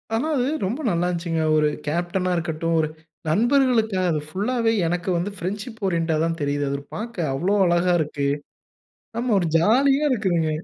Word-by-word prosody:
ஆனா 275 +8 0
அது 250 +1 +1 0.2
ரொம்ப 235 +10 -2
நல்லா 175 0 +1
இருந்துசுங்க. 170 -2 -1
ஒரு 150 0 +3 0.2
கேப்டனா 175 +3 -1
இருக்கட்டும், 165 0 -1
ஒரு 155 - +2 0.4
நண்பர்களுக்குத்தேன் 225 - +2
அது 155 - 0
ஃபுல்லாவே. 225 +5 0 0.2
எனக்கு 175 +2 -2
வந்து 190 +4 -2
ஃபிரண்ட்ஷிப் 205 +5 -5
ஓரியன்ட்டா 165 -3 0
தான் 165 0 -2
தெரியுது. 145 0 0
அத 140 - -1
ஒரு 140 - -15
பாக்க 230 0 -6 0.2
அவ்வளோ 180 +9 +1
அழகா 175 +1 +2
இருக்கு. 145 -2 -2 0.9
ஆமா 250 +1 -2
ஒரு 175 - 0
ஜாலியா 270 - +3
இருக்குங்க. 175 -9 +1
180 Hz, 160 wpm, -23 LUFS, 165-225 Hz, 0.9 s, ஒரு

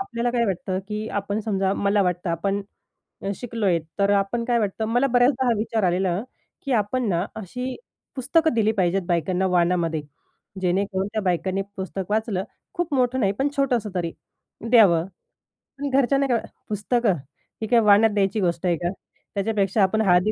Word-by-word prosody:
आपल्याला 245 -12 -2
काय 240 -1 +1
वाटतं 185 -1 -2
की 215 +1 -3
आपण 200 +2 -3
समजा 195 -3 0
मला 200 0 +2
वाटतं 180 -1 -1
आपण, 195 +4 -1 0.7
शिकलो 230 -1 -3
आहे 175 -3 +3 0.2
तर 200 0 +3
आपण 205 +4 +1
काय 240 0 +2
वाटतं 215 0 -1
मला 245 +4 +2
बऱ्याचदा 255 +1 +3
हा 240 - +4
विचार 220 -1 -1
आलेला 180 +1 +1 0.4
की 275 - -2
आपण 230 +2 0
ना 175 -2 +1
अशी 250 +6 -5 0.4
पुस्तकं 300 +4 +2
दिली 220 -1 +2
पाहिजेत 190 -2 +1
बायकांना 180 +2 +1
वाणामध्ये. 170 -3 +1 0.6
जेणेकरून 190 +1 0
त्या 220 - 0
बायकांनी 190 +1 0
पुस्तक 190 0 -5
वाचलं 215 -3 0 0.3
खूप 350 -3 -2
मोठं 255 0 +1
नाही 195 -4 +2
पण 275 - +2
छोटंसं 250 -6 +1
तरी 170 -2 -2 0.6
द्यावं. 195 -9 +6 0.7
पण 285 0 -3
घरच्यांना 275 +1 +2
काय 240 -3 +1 0.3
"पुस्तकं, 215 +1 +1 0.5
ही 220 - -2
काय 235 +1 +5
वाण्यात 210 0 +5
द्यायची 200 +1 +1
गोष्ट 175 -2 -1
आहे 175 -1 +3
का? 175 +2 -2 0.5
त्याच्यापेक्षा 200 0 +1
आपण 220 +3 +2
हळदी 185 0 +4
205 Hz, 160 wpm, -24 LUFS, 185-235 Hz, 0.7 s, द्यावं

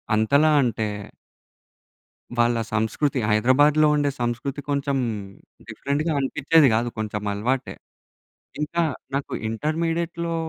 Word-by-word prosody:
అంతలా 140 +8 +3
అంటే 115 -3 -1 1.5
వాళ్ళ 120 0 +3 0.2
సంస్కృతి, 115 +6 0
హైదరాబాద్‌లో 145 +8 +4
ఉండే 145 -1 +1
సంస్కృతి 120 +4 -2
కొంచెం 140 -1 0 0.7
డిఫరెంట్‌గా 150 +4 -2
అనిపిచ్చేది 145 +2 +3
గాదు, 115 +2 +1
కొంచెం 105 -1 -3
అలవాటే. 125 +6 -2 0.9
ఇంకా 170 +3 -1 0.3
నాకు 140 0 -3 0.2
ఇంటర్మీడియేట్‌లో 165 +6 -2
140 Hz, 90 wpm, -23 LUFS, 120-150 Hz, 1.5 s, హైదరాబాద్‌లో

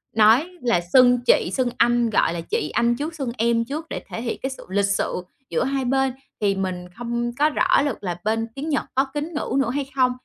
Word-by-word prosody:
nói 225 +10 +5
là 235 -8 +2
xưng 250 -1 +6
chị - - +3
xưng 255 -2 +1
anh, 240 0 +3
gọi 205 - +2
là, 170 - -3
chị 150 - -2
anh 235 0 +2
trước 305 +6 -4
xưng 270 -6 -3
em 230 0 +2
trước 300 +6 -5
để - - -5
thể 225 - -5
hiện 235 - -3
cái 265 - 0
sự 265 - -9
lịch 200 +1 +2
sự 200 -2 -1 0.3
giữa - - 0
hai 270 -1 -1
bên. 265 0 +1 0.3
Thì 200 -1 +2
mình 185 -2 -3
không 240 0 -2
có 300 +1 +5
rõ 345 +2 +3
lược 280 -7 -2
là 175 -2 -3
bên 225 +1 0
tiếng 290 +4 -4
Nhật 285 - 0
có 270 +1 +3
kính 300 +3 -3
ngữ 295 - -2
nữa 270 - +1
hay 275 +1 -2
không? 255 -2 +3
240 Hz, 235 wpm, -23 LUFS, 225-275 Hz, 0.3 s, xưng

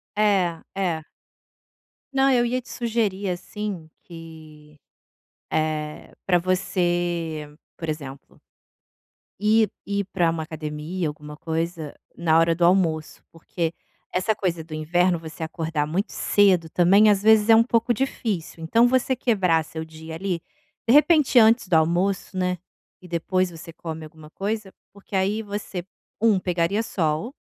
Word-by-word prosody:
É, 190 -6 +2
é. 180 -5 -1 1.1
Não, 270 0 +4
eu 240 -1 +3
ia 250 +2 -1
te - - -17
sugerir, 215 -5 -1
assim, 180 -2 -5
que, 155 -3 -13 0.7
eh, 155 -1 -2
pra 180 -2 +3
você, 175 -3 -1 0.3
por 165 - -6
exemplo 140 -3 -7 1.0
ir 215 0 +4 0.2
ir 200 0 -1
pra 175 -3 +3
uma 160 -1 -3
academia, 155 +2 -4
alguma 150 0 -8
coisa, 165 -1 -3 0.2
na 165 -1 +3
hora 165 0 +3
do 170 +1 +2
almoço, 170 -4 +1
porque 165 0 -3 0.4
essa 185 +4 +1
coisa 175 -5 -2
do 155 0 -11
inverno, 175 +3 +1
você 160 0 -8
acordar 160 -2 -2
muito 180 +8 -2
cedo 185 -5 +3
também, 195 +6 +5
às 200 -2 +3
vezes, 215 0 +5
é 225 - +9
um 230 - +6
pouco 235 0 +1
difícil, 205 -10 -3
então 230 +9 +4
você 260 +1 +1
quebrar 190 -10 +2
seu 160 +1 -7
dia, 160 0 -9
ali, 180 -1 -3 0.5
de 230 - +4
repente 300 -2 +5
antes 225 -1 +5
do 180 - +2
almoço, 180 +5 +1
né, 180 0 0 0.4
e 180 - -13
depois 180 +2 0
você 165 0 -10
come 160 -2 -7
alguma 155 0 -14
coisa, 205 +1 -4 0.2
porque 200 0 -9
aí 200 +4 +1
você, 205 -3 -5 0.4
1, 220 -4 +4
pegaria 180 +3 0
sol, 185 - -2
175 Hz, 140 wpm, -24 LUFS, 160-205 Hz, 1.1 s, é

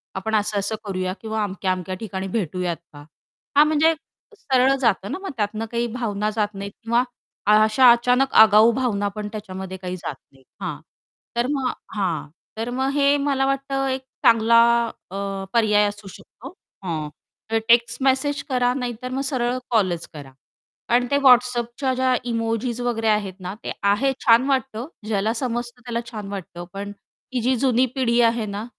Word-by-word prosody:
आपण 220 +3 -2
असं-असं 210 0 0
करूया." 185 -2 -2
किंवा 220 -1 -2
"अमक्या-अमक्या 185 -1 -2
ठिकाणी 190 -2 -4
भेटूयात 180 -2 -2 0.2
का?" 145 - -11 0.6
हां, 300 - +8
म्हणजे 315 +1 +3 0.4
सरळ 265 -3 +3
जातं 200 -4 +1
ना - - -2
मग 390 - -5
त्यातनं 215 +1 -2
काही 235 0 0
भावना 215 -4 -2
जात 210 -1 0
नाहीत 200 +1 -6
किंवा 235 +2 +2 0.5
अशा 215 +4 +6
अचानक 250 +3 +2
आगाऊ 220 +1 +7
भावना 210 -6 0
पण 210 -1 -4
त्याच्यामध्ये 190 -3 -7
काही 180 0 -5
जात 150 - -5 0.2
नाहीत. 135 -1 -23 0.2
हां, - - -4 0.6
तर 240 +1 +1
मग 270 -3 0 0.2
हां, 180 -7 -1 0.3
तर 230 +2 -3
मग 265 +1 +1
हे 285 0 +4
मला 270 -1 +1
वाटतं 275 0 -1
एक 260 0 -1 0.2
चांगला 230 0 +6 0.5
अ, - - -7 0.4
पर्याय 210 -3 +4
असू 205 -1 -7
शकतो. - - -12 0.3
हां, 155 -4 -3 0.4
तर 225 - +3
टेक्स्ट 235 +1 +3
मेसेज 275 +2 +1
करा, 250 -1 +2
नाहीतर 250 -1 -4
मग 265 +1 -2
सरळ 255 -2 -1
कॉलच 185 -7 +1
करा. 140 -3 -10 0.6
कारण 245 +1 +3
ते 280 - +4
WhatsAppच्या 250 +1 +3
ज्या 255 0 +2 0.2
इमोजीज 230 +1 -2
वगैरे 225 -2 -1
आहेत 210 -3 +1
ना, 180 +1 -5
ते - - -4
आहे, 205 +7 +3
छान 230 +2 +6
वाटतं, 265 -2 -1 0.2
ज्याला 215 +1 0
समजतं 240 0 -3
त्याला 235 -1 -2
छान 210 -3 -6
वाटतं, 175 -3 -7
पण 200 +1 -5 0.4
ही 245 - 0
जी 255 +2 +2
जुनी 255 0 +4
पिढी 240 -2 +2
आहे 230 -1 -1
ना, 205 +2 -5
230 Hz, 165 wpm, -22 LUFS, 200-250 Hz, 0.6 s, हां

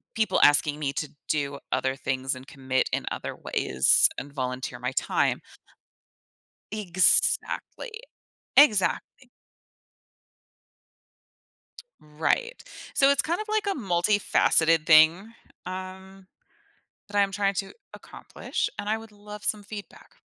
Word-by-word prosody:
people 220 -1 +1
asking 145 0 +4
me 140 -2 -2
to 150 - -4 0.2
do 140 -2 -2
other 130 0 -1
things, 130 0 -3
and 130 +1 -12
commit 130 -2 -2
in - - -1
other - - -5
ways, 65 +1 +3
and 140 +1 -7
volunteer 130 -1 -4
my - - -3
time. - - 0 1.3
Exactly. 195 - +1 0.7
Exactly. 255 +1 +3 2.7
Right. 160 - -2 0.3
So, 275 0 +4
it's 280 - +3
kind 345 +6 -2
of 430 - -8
like 430 -1 -1
a 395 - 0
multifaceted 175 -5 +2
thing, 170 +7 +5 0.3
um, 190 +1 -9 0.8
that 205 - -6
I'm 200 -1 +2
trying 200 0 0
to 195 +1 -4 0.2
accomplish, - - -6
and 205 - -5
I 220 - +1
would 225 0 -13
love 210 0 -11
some 210 -1 0
feedback. 205 0 -11
185 Hz, 115 wpm, -25 LUFS, 145-215 Hz, 2.7 s, thing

